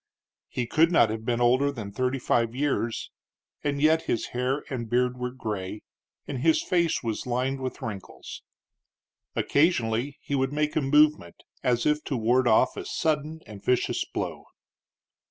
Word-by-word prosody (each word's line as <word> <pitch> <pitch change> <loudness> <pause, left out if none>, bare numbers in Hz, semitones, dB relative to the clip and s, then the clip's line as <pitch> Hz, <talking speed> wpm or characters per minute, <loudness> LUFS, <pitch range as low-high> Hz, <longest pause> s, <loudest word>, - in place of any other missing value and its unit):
He 125 - -2
could 165 +7 +3
not 115 -10 +5
have 110 0 -5
been 120 0 0
older 130 +4 +3
than 110 -7 -7
thirty 130 +5 -1
five 120 -2 0
years, 130 -5 -1 0.5
and 145 -1 -1
yet 160 +2 +3
his 115 - -1
hair 130 +3 -1
and 120 -5 -4
beard 125 +1 +2
were 125 0 -3
gray, 105 -5 -5 0.4
and 135 - -4
his 160 +5 +3
face 170 -6 +1
was 115 +1 -3
lined 130 +2 -1
with 130 -1 -5
wrinkles. 100 -4 -7 0.9
Occasionally 140 -4 +1
he - - -6
would 135 0 +1
make 150 0 0
a - - +2
movement 150 - +3 0.2
as 120 -1 +1
if 150 0 +2
to 135 - -2
ward 120 +3 +2
off - - +4
a - - -4
sudden 155 0 -1
and 105 -2 -11
vicious 125 -1 +1
blow. - - -5
130 Hz, 160 wpm, -26 LUFS, 115-145 Hz, 0.9 s, not